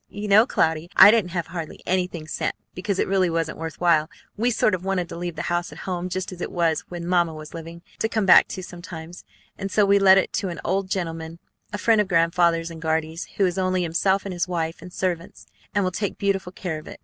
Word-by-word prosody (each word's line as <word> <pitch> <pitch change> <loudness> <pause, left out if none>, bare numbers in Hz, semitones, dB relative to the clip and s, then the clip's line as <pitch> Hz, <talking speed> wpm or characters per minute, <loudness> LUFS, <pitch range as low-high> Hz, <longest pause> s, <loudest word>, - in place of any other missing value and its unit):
You 205 +1 -6
know, 210 +4 +6
Cloudy, 160 +1 0
I 205 - +10
didn't 220 -5 +2
have 170 -1 -2
hardly 165 -3 -7
anything 180 -3 -1
sent, - - -2 0.2
because 190 +1 -2
it - - +1
really 190 -2 +2
wasn't 165 -2 -2
worth 160 0 -6
while. 165 -3 +3 0.3
We 235 +4 +1
sort 215 -2 +2
of 185 -1 -2
wanted 190 -2 -1
to - - -7
leave 175 -1 -4
the - - -4
house 175 0 -1
at - - -11
home 180 -1 -3
just 185 +1 -3
as 180 -1 -9
it - - -4
was 165 -3 +1
when 175 -1 -6
Mamma 175 -2 +1
was 155 0 -10
living, 165 +1 -9 0.2
to 220 - 0
come 220 -3 0
back 185 - +7
to 185 - -6
sometimes; 175 -1 -9 0.4
and 195 0 -3
so 210 +1 +4
we 200 0 +4
let 190 -1 +7
it 190 - +1
to 195 -2 -1
an 170 - -6
old 190 +1 0
gentleman, 165 -3 -4 0.3
a 205 - -3
friend 220 +1 +3
of 205 - -2
Grandfather's 170 -1 +2
and 165 -1 -9
Guardy's, 160 +1 -1
who 195 - +4
has 180 0 -1
only 185 -1 +1
himself 190 +4 +1
and 195 - -4
his 175 0 -1
wife 165 -2 -3
and 180 +2 -10
servants, 175 -2 -3 0.3
and 205 - +3
will 185 - 0
take 205 +1 -3
beautiful 195 -2 -1
care 175 -4 -4
of 155 - -14
it. - - -10
180 Hz, 245 wpm, -24 LUFS, 165-190 Hz, 0.4 s, I